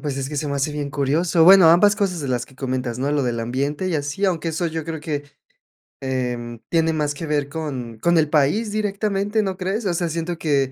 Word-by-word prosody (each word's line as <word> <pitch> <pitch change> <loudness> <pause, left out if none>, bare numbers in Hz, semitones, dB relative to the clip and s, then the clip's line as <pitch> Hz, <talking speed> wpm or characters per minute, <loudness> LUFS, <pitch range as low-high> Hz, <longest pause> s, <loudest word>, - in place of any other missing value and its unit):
pues, 145 -3 -3
es 135 -1 -3
que 150 - -5
se 145 +1 -2
me 140 - -2
hace 145 +2 -1
bien 145 -1 -4
curioso. 155 +5 +2
Bueno, 185 -1 +8
ambas 205 +5 +5
cosas 195 -5 -1
de 140 - -4
las 125 -2 -1
que 130 - -20
comentas, 125 -2 -3
¿no? 140 +3 0
Lo 145 - +1
del 120 -2 -1
ambiente 140 +9 -2
y 180 - -1
así, 150 +6 -2
aunque 170 -3 0
eso 165 +2 -1
yo 160 -1 -4
creo 160 0 -4
que, 150 -2 -3 0.8
em, 125 -3 -3
tiene 165 -1 +2
más 150 -2 -1
que 165 - -5
ver 145 -2 -1
con 135 -7 -5
con 170 +8 +3
el 155 -2 +1
país 155 +9 +2
directamente, 205 0 0
¿no 190 -3 -3
crees? 195 +4 -2
O 175 - +1
sea, 175 0 0
siento 165 +1 -3
que, 140 -5 +1
150 Hz, 235 wpm, -22 LUFS, 135-175 Hz, 0.8 s, Bueno